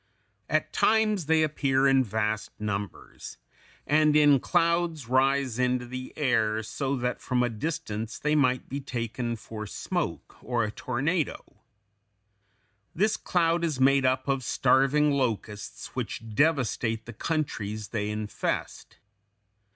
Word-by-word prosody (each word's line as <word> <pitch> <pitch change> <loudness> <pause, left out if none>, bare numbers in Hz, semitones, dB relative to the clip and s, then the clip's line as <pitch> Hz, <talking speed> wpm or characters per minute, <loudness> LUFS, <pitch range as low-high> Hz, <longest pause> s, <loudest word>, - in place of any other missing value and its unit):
] - - -45
At - - 0
times 215 -6 +2
they 160 0 +4
appear 140 -3 +1
in 135 -1 +4
vast 110 -1 -2
numbers, 105 -2 -5 0.5
and 150 0 +3
in 145 -2 +6
clouds 170 -3 +1
rise 130 -1 +2
into 125 0 +1
the 130 +1 -7
air, 110 -6 +1
so 135 +5 -2
that 125 -1 -2
from 125 -1 +1
a 120 - +1
distance 115 -4 -4
they 150 0 0
might 130 -4 +2
be 140 - -4
taken 120 -1 -3
for 110 -1 -8
smoke - - -4
or 120 -2 0
a 105 - -2
tornado. 140 +8 -2 1.4
This 210 +5 +2
cloud 170 -2 +1
is 155 -6 -1
made 135 +1 +4
up 130 +1 +1
of 135 -1 0
starving 140 +4 +3
locusts 115 -6 -3
which 115 -1 -5
devastate 125 -5 +1
the 120 - -8
countries 110 - -3
they 105 -2 -2
infest. 105 -1 -4
130 Hz, 130 wpm, -27 LUFS, 115-150 Hz, 1.4 s, in